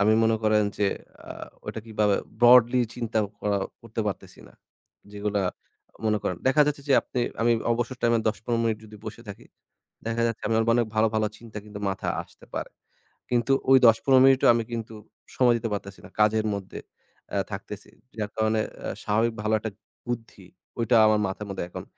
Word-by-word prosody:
আমি 105 Hz, +2 st, +4 dB
মনে 110 Hz, 0 st, +3 dB
করেন 110 Hz, -1 st, +3 dB
যে, 100 Hz, -, +2 dB, 0.4 s
আ -, -, -9 dB, 0.4 s
ওইটা 110 Hz, -, -5 dB
কিভাবে 105 Hz, -2 st, +1 dB, 0.3 s
broadly 120 Hz, +1 st, +7 dB
চিন্তা 115 Hz, -2 st, -2 dB, 0.2 s
করা 100 Hz, -1 st, 0 dB, 0.2 s
করতে 115 Hz, 0 st, -5 dB
পারতেছি 100 Hz, -, -6 dB
না। -, -, -19 dB, 0.6 s
যেগুলা 105 Hz, 0 st, -1 dB, 0.6 s
মনে 105 Hz, 0 st, +2 dB
করেন, 90 Hz, -3 st, -2 dB
দেখা 150 Hz, +3 st, +5 dB
যাচ্ছে 145 Hz, -1 st, -2 dB
যে -, -, +4 dB
আপনি 125 Hz, -, -3 dB, 0.2 s
আমি 120 Hz, +1 st, +4 dB, 0.2 s
অবসর 120 Hz, +2 st, -2 dB
time 120 Hz, 0 st, +3 dB
এ 115 Hz, -, +1 dB
১০-১৫ 115 Hz, +2 st, -2 dB
মিনিট 110 Hz, -2 st, 0 dB
যদি 105 Hz, 0 st, -12 dB
বসে 115 Hz, -, -8 dB
থাকি, 100 Hz, -, -9 dB, 0.6 s
দেখা 115 Hz, 0 st, 0 dB
যাচ্ছে 115 Hz, -2 st, -3 dB
আমার 115 Hz, 0 st, +2 dB
অনেক 120 Hz, -2 st, +2 dB
ভালো, 110 Hz, +1 st, +4 dB
ভালো 110 Hz, 0 st, +2 dB
চিন্তা 115 Hz, -2 st, -9 dB
কিন্তু 105 Hz, -1 st, -9 dB
মাথায় 95 Hz, -, -3 dB
আসতে -, -, -20 dB
পারে। -, -, -4 dB, 0.6 s
কিন্তু 120 Hz, +2 st, +2 dB, 0.2 s
ওই 135 Hz, -, +9 dB
১০-১৫ 130 Hz, +3 st, +5 dB
মিনিটও 135 Hz, -1 st, +5 dB
আমি 115 Hz, 0 st, 0 dB
কিন্তু 115 Hz, -1 st, -5 dB, 0.4 s
সময় 120 Hz, -2 st, +4 dB
দিতে 115 Hz, 0 st, -3 dB
পারতেছি 100 Hz, -1 st, -6 dB
না। -, -, -12 dB
কাজের 110 Hz, +1 st, +3 dB
মধ্যে 100 Hz, -1 st, -7 dB, 0.5 s
এ্যা -, -, 0 dB
থাকতেছি। -, -, -7 dB, 0.3 s
যার 105 Hz, -, -2 dB
কারণে 110 Hz, 0 st, +1 dB
এ্যা -, -, -7 dB
স্বাভাবিক 110 Hz, +2 st, +1 dB
ভালো 110 Hz, +1 st, 0 dB
একটা 110 Hz, 0 st, -5 dB, 0.4 s
বুদ্ধি, 115 Hz, -5 st, -6 dB, 0.3 s
ওইটা 120 Hz, +1 st, +2 dB
আমার 110 Hz, 0 st, +4 dB
মাথার 100 Hz, +2 st, -5 dB
মধ্যে 95 Hz, -, -4 dB
এখন -, -, -7 dB
110 Hz, 180 wpm, -26 LUFS, 105-120 Hz, 0.6 s, ওই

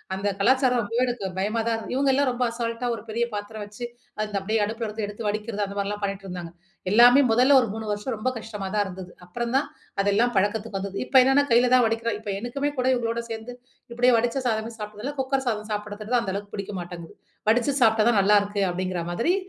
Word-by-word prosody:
அந்த 200 Hz, +2 st, -1 dB
கலாச்சாரம் 255 Hz, +3 st, +3 dB
ரொம்பவே 230 Hz, +3 st, 0 dB
எனக்கு 240 Hz, -5 st, -3 dB
பயமா 210 Hz, +4 st, 0 dB
தான் 225 Hz, -1 st, 0 dB
இரு -, -, -8 dB
இவுங்க 275 Hz, +2 st, +2 dB
எல்லாம் 280 Hz, +1 st, +2 dB
ரொம்ப 250 Hz, 0 st, -1 dB
அசால்ட்டா 235 Hz, +1 st, -3 dB
ஒரு -, -, -8 dB
பெரிய 235 Hz, +2 st, 0 dB
பாத்திரம் 210 Hz, +1 st, -5 dB
வச்சு, 210 Hz, +4 st, -7 dB, 0.4 s
அந்த 210 Hz, -1 st, -4 dB
அப்டியே 215 Hz, +3 st, 0 dB
அடுப்புல 225 Hz, +2 st, -3 dB
இருந்து 215 Hz, 0 st, -3 dB
எடுத்து 210 Hz, +2 st, -5 dB
வடிக்கிறது, 210 Hz, 0 st, -2 dB
அந்த 200 Hz, 0 st, -8 dB
மாரிலாம் 205 Hz, +1 st, -2 dB
பண்ணிட்டுருந்தாங்க. 190 Hz, -4 st, -4 dB, 0.4 s
எல்லாமே 245 Hz, +5 st, +8 dB
முதல்ல 255 Hz, +5 st, +5 dB
ஒரு 240 Hz, -, -1 dB
3 220 Hz, 0 st, -5 dB
வருஷம் 210 Hz, +5 st, -3 dB
ரொம்ப 215 Hz, +4 st, -1 dB
கஷ்டமா 215 Hz, -3 st, -6 dB
தான் 210 Hz, -1 st, +2 dB
இருந்தது. 185 Hz, -1 st, -8 dB
அப்புறம் 235 Hz, +7 st, -4 dB
தான் 280 Hz, +2 st, +2 dB, 0.3 s
அதெல்லாம் 205 Hz, +5 st, +2 dB
பழக்கத்துக்கு 205 Hz, +1 st, 0 dB
வந்தது. 195 Hz, 0 st, -5 dB
இப்போ 265 Hz, -, +3 dB
என்னான்னா, 270 Hz, +2 st, +4 dB
கையில 245 Hz, +2 st, +5 dB
தான் 250 Hz, -2 st, +5 dB
வடிக்கிறோம், 225 Hz, -1 st, -1 dB
இப்ப 210 Hz, -, -7 dB
எனக்குமே 275 Hz, +6 st, -2 dB
கூட 250 Hz, -, +1 dB
இவங்களோட 235 Hz, -1 st, -1 dB
சேந்து 225 Hz, +2 st, -6 dB, 0.4 s
இப்டியே 245 Hz, +1 st, +4 dB
வடிச்ச 240 Hz, +3 st, 0 dB
சாதமே 225 Hz, 0 st, -1 dB
சாப்பிட்டதுல, 210 Hz, +6 st, -5 dB
குக்கர் 265 Hz, 0 st, 0 dB
சாதம் 215 Hz, -2 st, -2 dB
சாப்பிடுறது 210 Hz, +2 st, -4 dB
தான் 240 Hz, -, +4 dB
அந்த 190 Hz, -, -3 dB
அளவுக்கு 200 Hz, +1 st, -6 dB
புடிக்க 200 Hz, 0 st, -5 dB
மாட்டேங்குது. 175 Hz, -1 st, -8 dB, 0.3 s
வடிச்சு 245 Hz, +5 st, +3 dB
சாப்பிட்டா 220 Hz, -2 st, +5 dB
தான் 225 Hz, -4 st, +3 dB
நல்லாருக்கு 205 Hz, 0 st, +3 dB
அப்படிங்கிற 185 Hz, -1 st, -2 dB
மாதிரி 235 Hz, -, +1 dB
220 Hz, 205 wpm, -25 LUFS, 205-240 Hz, 0.4 s, எல்லாமே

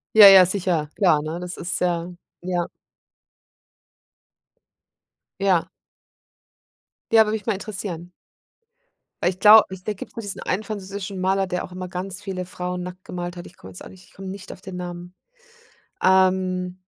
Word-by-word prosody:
Ja, 210 Hz, -2 st, +11 dB
ja, 190 Hz, -2 st, +9 dB
sicher, 175 Hz, -5 st, -1 dB
klar, 175 Hz, -7 st, +4 dB
ne? 155 Hz, +2 st, -4 dB
Das 180 Hz, 0 st, -6 dB
ist 175 Hz, -, -3 dB
ja 175 Hz, -1 st, -1 dB, 0.3 s
ja. 175 Hz, -1 st, -2 dB, 2.7 s
Ja. 185 Hz, -4 st, +2 dB, 1.4 s
Ja. 225 Hz, -, +7 dB
Würde 210 Hz, -, -2 dB
mich 220 Hz, -2 st, -4 dB
mal 225 Hz, -, +2 dB
interessieren. 190 Hz, -4 st, -6 dB, 1.1 s
Weil 175 Hz, -, +3 dB
ich 185 Hz, 0 st, -10 dB
glaube 215 Hz, +1 st, +8 dB
ich 185 Hz, -, -12 dB
da 215 Hz, -, -2 dB
gibt 190 Hz, -, -9 dB
es -, -, -35 dB
nur 230 Hz, -, -4 dB
diesen 205 Hz, -2 st, -5 dB
einen 195 Hz, +4 st, -1 dB
französischen 200 Hz, -2 st, -6 dB
Maler, 190 Hz, +1 st, +1 dB
der 180 Hz, 0 st, -2 dB
auch -, -, -10 dB
immer 185 Hz, 0 st, -6 dB
ganz 185 Hz, +2 st, -5 dB
viele 190 Hz, -2 st, -4 dB
Frauen 180 Hz, 0 st, -5 dB
nackt 180 Hz, +1 st, -9 dB
gemalt 175 Hz, 0 st, -6 dB
hat. 175 Hz, -, -8 dB
Ich -, -, -15 dB
komme 95 Hz, -, -12 dB
jetzt 90 Hz, -, -10 dB
auch -, -, -10 dB
nicht 185 Hz, 0 st, -16 dB
ich -, -, -23 dB
komme 195 Hz, 0 st, -8 dB
nicht 190 Hz, 0 st, -8 dB
auf -, -, -11 dB
den 190 Hz, -1 st, -8 dB
Namen, 175 Hz, 0 st, -7 dB, 0.9 s
ähm. 185 Hz, -1 st, +2 dB
185 Hz, 170 wpm, -23 LUFS, 180-195 Hz, 2.7 s, Ja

